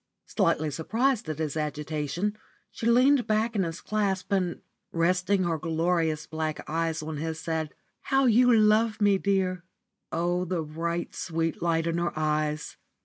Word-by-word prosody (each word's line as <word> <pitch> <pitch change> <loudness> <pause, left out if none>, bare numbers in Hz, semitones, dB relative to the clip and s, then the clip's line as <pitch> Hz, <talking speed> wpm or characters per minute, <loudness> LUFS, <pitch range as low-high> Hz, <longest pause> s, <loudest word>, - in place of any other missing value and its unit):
Slightly 155 0 +1
surprised 225 - 0
at 155 - -3
his 155 -2 -2
agitation, 155 +5 -2 0.4
she 230 - -3
leaned 250 +1 +4
back 220 +1 +1
in 200 - +2
his 165 -2 -3
clasp, 200 -3 -1
and, 185 -3 0 0.3
resting 185 +3 +2
her 165 -2 -1
glorious 165 -1 0
black 155 -1 -4
eyes 160 0 -1
on 155 0 -5
his, 160 +1 -3
said 160 -2 -3 0.3
"How 270 0 +3
you 245 +1 +5
love 215 0 +4
me, 205 -2 +4
dear!" 190 -3 0 0.5
Oh, 175 +1 0
the 180 -2 -2
bright, 170 +3 -3
sweet 165 -2 -2
light 165 -1 +1
in 170 0 0
her 170 -2 -2
eyes! 155 -1 -1
170 Hz, 150 wpm, -27 LUFS, 160-205 Hz, 0.5 s, you